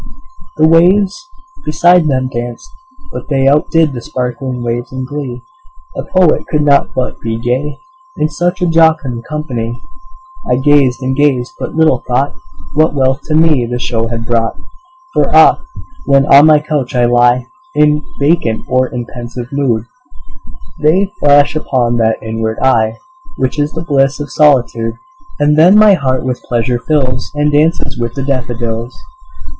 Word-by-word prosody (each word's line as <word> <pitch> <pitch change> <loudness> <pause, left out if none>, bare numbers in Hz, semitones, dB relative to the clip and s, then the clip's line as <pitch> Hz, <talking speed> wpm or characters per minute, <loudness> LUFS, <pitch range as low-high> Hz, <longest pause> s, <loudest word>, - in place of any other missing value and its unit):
The 155 - +4
waves 190 - +2 0.3
beside 170 +2 +3
them 130 -2 0
danced; 120 - -6 0.4
but 125 - -8
they 135 -2 +1
Outdid 150 +1 +2
the 120 - -6
sparkling 125 -2 -4
waves 120 +1 -3
in 130 0 -5
glee; 130 -3 -6 0.5
A - - -3
poet 185 -4 +1
could 150 -1 0
not 140 -1 +2
but 130 -1 -3
be 115 -1 -3
gay, 130 +5 -2 0.4
In 150 - +1
such 175 +4 -2
a - - +3
jocund 160 -8 +1
company; 125 -6 -4 0.7
I - - +3
gazed 135 -1 +2
and 130 +1 -1
gazed 130 -3 +1
but - - -6
little 155 -6 +2
thought 130 +3 0 0.4
What 155 0 +2
wealth 135 +1 +1
to 155 - -1
me 155 -6 +3
the 120 - -1
show 115 -2 -2
had 115 0 -5
brought: 115 -1 -1 0.6
For - - +1
oft, 350 - +5 0.4
when 140 0 +4
on 145 +2 +6
my 155 -1 +6
couch 150 -4 -3
I 120 -1 +3
lie 120 +1 +3 0.3
In 150 0 +3 0.2
vacant 140 -7 0
or 130 0 +1
in 125 -2 -6
pensive 120 0 -8
mood, 125 -6 -1 0.9
They 185 +7 +1
flash 145 +1 +4
upon 125 -6 0
that 110 -1 +1
inward 110 0 -3
eye 115 -4 +2 0.4
Which 130 +3 -2
is 145 +1 0
the 160 - -5
bliss 140 -2 +1
of 145 - -6
solitude; 120 -6 +2 0.4
And 150 +1 +2
then 180 +6 +6
my 215 -1 +6
heart 130 -7 -1
with 125 -1 -3
pleasure 120 0 -1
fills, 130 -2 -1
And 150 0 +1
dances 145 -3 0
with 120 -1 -3
the 135 - -3
daffodils. 120 -3 -3
135 Hz, 160 wpm, -13 LUFS, 120-150 Hz, 0.9 s, on